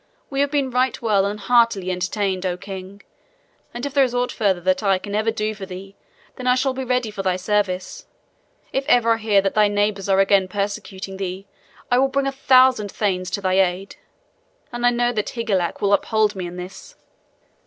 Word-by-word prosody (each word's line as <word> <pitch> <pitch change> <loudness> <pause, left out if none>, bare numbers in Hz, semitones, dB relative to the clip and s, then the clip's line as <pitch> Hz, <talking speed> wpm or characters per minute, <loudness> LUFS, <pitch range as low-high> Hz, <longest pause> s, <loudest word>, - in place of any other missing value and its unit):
We 275 - -2
have 285 - +2
been 280 -3 0
right 255 +1 +1
well 205 -4 +2
and 205 +1 -4
heartily 210 -3 +2
entertained, 185 +1 -2
O 180 -1 -1
king, 195 +1 -9 0.7
and 240 +3 -6
if 285 - -4
there 280 -2 +5
is 250 -2 -1
aught 245 0 0
further 195 -4 +1
that 185 +3 0
I 195 -2 +2
can 200 +2 -8
ever 215 +2 +1
do 215 -1 -2
for 200 -2 -8
thee, 195 +1 -9 0.4
then 255 -1 -5
I 250 - +5
shall 260 +1 0
be 265 0 -4
ready 250 -3 -1
for 205 -2 -5
thy 185 -2 0
service. 185 -1 -2 0.7
If 270 - 0
ever 235 -5 +4
I - - -1
hear 215 -3 +2
that 195 - 0
thy 210 -1 +4
neighbors 205 -1 -1
are 195 0 +4
again 195 -1 +4
persecuting 195 0 -4
thee, 190 0 -5 0.5
I 245 - +4
will 270 - +4
bring 275 +1 -1
a 275 - 0
thousand 255 -5 +4
thanes 185 -3 -1
to 200 - -3
thy 185 0 +2
aid; 190 +1 0 0.7
and 240 0 0
I - - +7
know 240 0 +1
that 210 -2 -2
Higelac 200 -7 -2
will 200 0 +3
uphold 215 0 +2
me 185 -2 -4
in 175 - -8
this." 185 - -9
205 Hz, 205 wpm, -21 LUFS, 190-245 Hz, 0.7 s, I